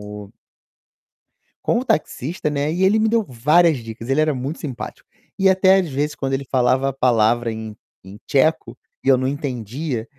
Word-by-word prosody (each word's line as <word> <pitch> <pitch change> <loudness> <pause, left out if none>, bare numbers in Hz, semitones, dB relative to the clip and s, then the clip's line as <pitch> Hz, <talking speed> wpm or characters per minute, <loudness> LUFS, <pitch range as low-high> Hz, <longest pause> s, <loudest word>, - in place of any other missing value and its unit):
o 105 -1 -9 1.3
com 235 - +1
o 260 - -5
taxista, 150 - -1
né, 145 +1 -1
e 185 +2 0
ele 210 +3 +4
me 220 - +2
deu 225 0 +2
várias 150 +4 +3
dicas, 115 +1 -9
ele 135 +3 +2
era 155 -1 +2
muito 135 +6 -5
simpático. 135 -7 -7 0.3
E 190 0 +4
até 190 0 +5
às 180 -5 0
vezes 145 +2 -2
quando 135 -2 -3
ele 135 +1 -2
falava 130 +1 +2
a - - -5
palavra 120 -2 +2
em 110 -1 -7 0.3
em 100 +2 -11
tcheco, 155 +3 +1 0.2
e - - -9
eu 135 - +7
não 130 - -2
entendia, 130 -2 -3
135 Hz, 185 wpm, -20 LUFS, 120-160 Hz, 1.3 s, eu